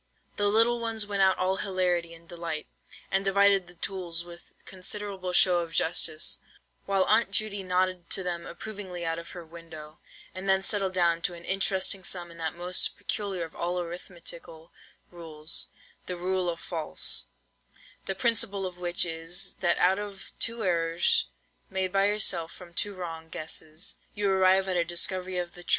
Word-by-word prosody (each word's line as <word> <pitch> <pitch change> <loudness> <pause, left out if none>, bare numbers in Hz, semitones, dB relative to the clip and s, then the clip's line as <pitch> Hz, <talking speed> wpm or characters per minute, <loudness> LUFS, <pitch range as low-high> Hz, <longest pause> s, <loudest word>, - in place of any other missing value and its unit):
The 205 - +2
little 230 +3 +4
ones 225 -2 0
went 200 -1 -1
out 190 -1 +5
all 185 +1 +1
hilarity 180 -4 0
and 165 0 -15
delight, 170 -3 -4 0.5
and 195 0 +3
divided 195 -1 +4
the 175 - -14
tools 170 -2 -1
with 175 0 -13
considerable 190 0 -3
show 180 0 +5
of 165 -1 -4
justice, 160 -1 +2 0.5
while 195 -1 +3
Aunt 230 - +4
Judy 205 0 +1
nodded 185 -1 0
to 190 - +3
them 175 -1 -2
approvingly 185 -2 -6
out 165 0 -1
of 170 - -9
her 170 - -8
window, 160 -2 -11 0.3
and 190 +1 -4
then 190 0 +4
settled 195 -2 +1
down 170 -2 +3
to 175 - -1
an 170 - -11
interesting 190 0 +1
sum 175 -1 0
in 170 - -12
that 160 0 -2
most 180 +1 +2
peculiar 200 -2 -3
of 160 - -9
all 175 +1 -1
arithmetical 170 -2 -8 0.4
rules, 160 -2 -3 0.4
"The 180 - -4
Rule 185 0 0
of 165 -1 -4
False," 165 -3 -1 0.8
the - - 0
principle 230 -5 +2
of 180 -1 -6
which 175 0 +3
is, 165 +1 -1
that 175 -2 +3
out 190 +2 +4
of 205 -2 -7
two 230 0 0
errors, 170 -2 +3 0.4
made 190 -1 -1
by 195 0 +4
yourself 190 -5 +2
from 175 -2 -13
two 205 +3 0
wrong 165 -3 -6
guesses, 155 +3 -2 0.2
you 205 -1 +1
arrive 190 0 +4
at 185 - 0
a 170 - +3
discovery 180 +2 -1
of 175 -1 -3
the 175 - -10
truth! 175 - -13
180 Hz, 170 wpm, -28 LUFS, 170-195 Hz, 0.8 s, out